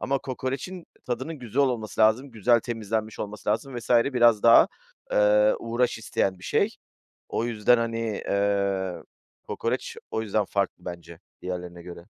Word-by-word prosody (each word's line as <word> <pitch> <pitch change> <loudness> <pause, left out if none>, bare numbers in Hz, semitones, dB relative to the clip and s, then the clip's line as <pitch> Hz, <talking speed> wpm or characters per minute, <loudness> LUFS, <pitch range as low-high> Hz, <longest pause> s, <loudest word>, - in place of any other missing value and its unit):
Ama 135 +1 0
kokorecin 135 +8 -5 0.2
tadının 130 +6 -4
güzel 125 +2 0
olması 115 -7 -1
lazım, 110 +6 +3
güzel 115 +1 +3
temizlenmiş 110 -1 -3
olması 105 0 -6
lazım 115 +5 -1
vs. 115 - -11
biraz 120 -3 +4
daha, 115 0 +7 0.4
eee, 105 0 +4
uğraş 120 +1 -1
isteyen 95 -3 -1
bir 90 - -13
şey. - - +2 0.6
O - - 0
yüzden, 120 0 +3
hani, 115 0 -2 0.3
eee, 100 -2 0 0.5
kokoreç, - - -3
o 110 - -1
yüzden 105 -1 0
farklı 100 -2 -2
bence 85 -1 -8 0.2
diğerlerine 90 -1 -6
göre. 85 -1 -10
110 Hz, 145 wpm, -26 LUFS, 100-120 Hz, 0.6 s, daha